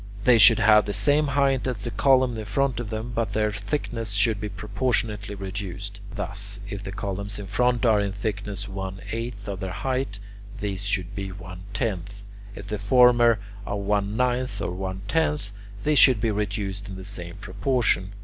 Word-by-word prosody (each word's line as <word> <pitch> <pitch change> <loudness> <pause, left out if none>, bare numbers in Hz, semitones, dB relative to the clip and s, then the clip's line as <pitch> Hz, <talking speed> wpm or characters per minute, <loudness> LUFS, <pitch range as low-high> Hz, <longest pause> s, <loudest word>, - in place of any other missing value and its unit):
They 120 -1 +6
should 110 +2 +9
have 110 -2 +5
the 100 - -2
same 145 +1 +3
height 135 -2 +2
as 120 -6 -3
the 120 - -3
columns 130 +1 +3
in 110 - -5
front 125 +4 0
of 120 -3 -4
them, 110 +2 -4
but 115 -4 -1
their 105 0 +1
thickness 110 +1 -3
should 105 0 +2
be 105 - -3
proportionately 105 +1 -1
reduced: 100 +1 -6 0.2
thus, 100 -1 -5
if 100 -1 -5
the 95 - -6
columns 100 0 -4
in 100 - -6
front 125 +5 +1
are 110 -3 +5
in 100 -1 0
thickness 100 0 -4
one 95 -1 -5
eighth 115 -2 -5
of 100 -2 -4
their 95 -1 -3
height, 130 +2 -2 0.4
these 100 -1 -3
should 100 -2 -1
be 100 -1 -4
one 90 -1 -9
tenth; 100 -3 -3 0.3
if 100 - -8
the 105 0 -4
former 120 +1 +5 0.3
are 100 - -3
one 100 +1 0
ninth 125 0 0
or - - -2
one 95 +1 -5
tenth, 150 -9 0 0.3
these 150 -1 +3
should 130 -5 +7
be 110 0 +1
reduced 100 -1 -3
in 95 - -6
the 95 0 -8
same 90 -3 -6
proportion. 100 -1 0
105 Hz, 185 wpm, -25 LUFS, 100-120 Hz, 0.4 s, should